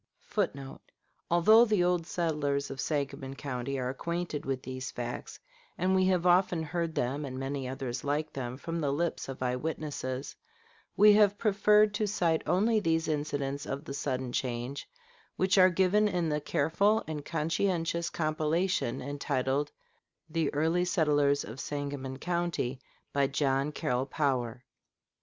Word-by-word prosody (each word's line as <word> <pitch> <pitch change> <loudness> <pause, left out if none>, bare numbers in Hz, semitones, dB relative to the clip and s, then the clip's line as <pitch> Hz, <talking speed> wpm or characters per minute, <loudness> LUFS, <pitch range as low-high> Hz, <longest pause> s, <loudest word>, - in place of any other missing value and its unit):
[Footnote: 140 -10 -3 0.5
Although 215 +7 +7
the 210 -5 +2
old 175 -2 +1
settlers 145 -6 -1
of 135 -1 -4
Sangamon 140 -2 -3
County 135 -1 -4
are 125 -1 -2
acquainted 170 +2 -3
with 130 -1 -2
these 130 0 -5
facts, 120 0 -6 0.4
and 185 +1 +1
we 185 0 +4
have 180 -2 +2
often 180 -2 +3
heard 165 +1 -2
them 135 +5 -1
and 130 -2 -5
many 135 0 -3
others 130 -1 -4
like 150 +2 -1
them 125 -2 -4
from 165 +4 -4
the 140 -2 +1
lips 165 0 -2
of 130 -1 -5
eye 125 0 0
witnesses, 140 -2 -4 0.6
we 210 +1 +8
have 205 -1 +5
preferred 210 0 +4
to 210 0 0
cite 170 -6 +1
only 210 +7 +3
these 165 -4 +1
incidents 145 -2 -2
of 140 +3 -4
the 140 - -5
sudden 130 -3 -2
change 125 +2 -3 0.5
which 190 +1 +3
are 185 0 +8
given 190 +4 +3
in 175 -5 0
the 150 0 -1
careful 200 +10 +2
and 155 -2 -4
conscientious 165 +2 0
compilation 155 -2 0
entitled 140 0 -1 0.6
"The 160 -2 0
Early 160 +4 +1
Settlers 145 -6 +2
of 115 +4 -9
Sangamon 140 -2 -4
County," 170 -6 -2 0.3
by 140 -1 +3
John 135 +1 0
Carroll 125 -2 -1
Power. 130 -4 -1
150 Hz, 145 wpm, -30 LUFS, 135-175 Hz, 0.6 s, we